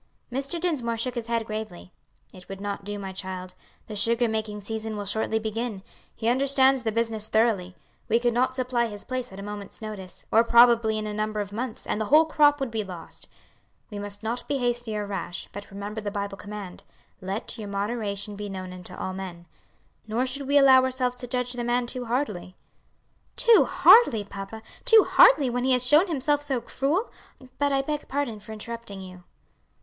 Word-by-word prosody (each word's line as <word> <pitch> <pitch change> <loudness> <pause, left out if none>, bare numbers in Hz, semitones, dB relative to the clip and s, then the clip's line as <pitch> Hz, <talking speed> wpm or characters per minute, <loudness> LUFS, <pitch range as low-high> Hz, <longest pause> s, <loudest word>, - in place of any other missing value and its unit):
Mr. 275 +6 -2
Dinsmore 270 -10 -1
shook 245 +2 -1
his 235 -2 -4
head 230 -1 0
gravely. 215 -4 -6 0.4
"It 185 -1 -14
would 195 0 -7
not 200 0 -4
do, 205 +1 -5
my 195 -1 -6
child. 185 -1 -6 0.3
The 215 - -7
sugar 230 +3 +2
making 215 -1 -3
season 220 +1 -4
will 205 - -4
shortly 220 +2 0
begin; 220 -2 -3 0.3
he 225 - -3
understands 265 +1 +3
the 220 -1 -1
business 225 -1 -1
thoroughly; 215 -5 +1 0.3
we 230 - +4
could 240 0 +1
not 255 +2 +1
supply 250 -2 0
his 205 -2 -7
place 255 -2 -4
at 190 - -10
a 200 - -7
moment's 205 -1 -8
notice, 210 -4 -8
or 225 - +6
probably 235 -2 +5
in 215 - -3
a 210 - -4
number 215 0 -2
of 205 -1 -4
months, 230 +1 -5
and 215 - -2
the - - 0
whole 305 +7 +6
crop 295 -2 +4
would 270 -4 -2
be 220 -1 -1
lost. 180 -4 -8 0.6
We 205 - -5
must 205 +1 -7
not 235 +3 -3
be 285 - 0
hasty 240 -3 -1
or 210 - -2
rash, 195 -2 -5
but 205 +1 -8
remember 205 +2 -6
the 210 - -3
Bible 200 -1 -4
command, 200 -2 -8 0.4
'Let 195 +5 -4
your 210 - -5
moderation 200 0 -3
be 205 0 -6
known 185 -1 -6
unto 180 -1 -9
all 185 - -4
men.' 180 -2 -7 0.6
Nor 230 +4 0
should 265 +1 -3
we 285 +1 +4
allow 265 -2 +7
ourselves 255 -1 0
to 245 - -7
judge 250 0 -1
the 245 -1 -3
man 240 +1 +1
too 245 +1 -5
hardly." 225 -7 -2 0.8
"Too 465 -2 +6
hardly, 275 - +6
papa! 200 +2 -8 0.2
too 450 -4 +7
hardly, 300 - +6
when 245 +1 -1
he 260 0 +3
has 250 0 +2
shown 300 +9 +6
himself 290 -2 +1
so 275 -4 -1
cruel! 300 - -1 0.5
But 285 0 +2
I 270 0 +2
beg 300 +1 -3
pardon 270 -6 -2
for 215 - -12
interrupting 220 -2 -7
you." 185 -1 -11
225 Hz, 195 wpm, -26 LUFS, 205-255 Hz, 0.8 s, allow